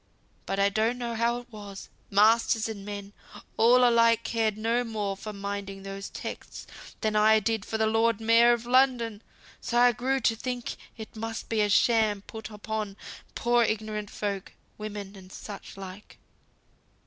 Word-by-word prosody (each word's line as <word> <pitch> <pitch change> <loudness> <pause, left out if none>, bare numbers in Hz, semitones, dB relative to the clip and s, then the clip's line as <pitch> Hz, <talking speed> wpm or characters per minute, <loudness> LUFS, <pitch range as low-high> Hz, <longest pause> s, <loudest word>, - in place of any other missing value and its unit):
But 195 - -1
I 200 0 +4
don't 220 +4 0
know 240 -1 -3
how 235 +1 +1
it 245 0 -11
was; 205 -2 -9 0.2
masters 220 +2 +4
and 210 -3 -6
men, 205 0 -7 0.4
all 245 +2 +6
alike 230 -1 +4
cared 220 -2 0
no 230 +3 +1
more 210 -4 -3
for 215 +2 -7
minding 200 -1 -5
those 195 0 -6
texts, - - -7 0.4
than 215 -1 0
I 215 +1 +5
did 220 -1 -1
for 220 - -3
th' - - -2
Lord 225 0 +2
Mayor 230 +1 +5
of 235 -1 0
London; 245 -4 +2 0.4
so 240 - -1
I 245 0 +6
grew 255 +3 0
to 225 -2 +2
think 245 +1 -4 0.2
it 220 0 -9
must 225 +1 -5
be 225 -2 +1
a 210 - +2
sham 215 -2 +3
put 220 0 -8
upon 210 -1 -5 0.4
poor 240 0 +3
ignorant 215 -1 -2
folk, 200 -2 -4 0.3
women, 205 -2 -6
and 185 -1 -13
such 200 -1 -9
like. 195 +1 -10
220 Hz, 165 wpm, -27 LUFS, 205-230 Hz, 0.4 s, all